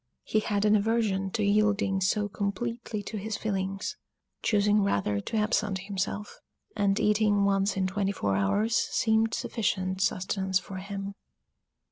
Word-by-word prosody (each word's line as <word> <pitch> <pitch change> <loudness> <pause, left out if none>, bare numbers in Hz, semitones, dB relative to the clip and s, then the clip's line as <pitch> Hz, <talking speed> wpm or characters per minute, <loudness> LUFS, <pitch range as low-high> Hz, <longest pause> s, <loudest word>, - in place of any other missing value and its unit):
He 215 - +1
had 205 -1 0
an 210 0 +5
aversion 205 -3 +1
to 220 - 0
yielding 200 -1 +2
so 205 +2 +1
completely 210 +2 -3
to 215 - -5
his 210 +1 -3
feelings, 195 -2 -3 0.4
choosing 210 0 +3
rather 100 - +1
to 220 - -3
absent 210 -2 +1
himself; 195 +1 -4 0.4
and 200 -2 +2
eating 210 -1 +3
once 195 0 +1
in 190 - +1
twenty 195 +1 0
four 100 - -1
hours 205 - +1
seemed 220 -1 +2
sufficient 190 -4 -1
sustenance 190 0 +1
for 185 +1 -6
him. 195 +1 -5
200 Hz, 140 wpm, -28 LUFS, 190-215 Hz, 0.4 s, an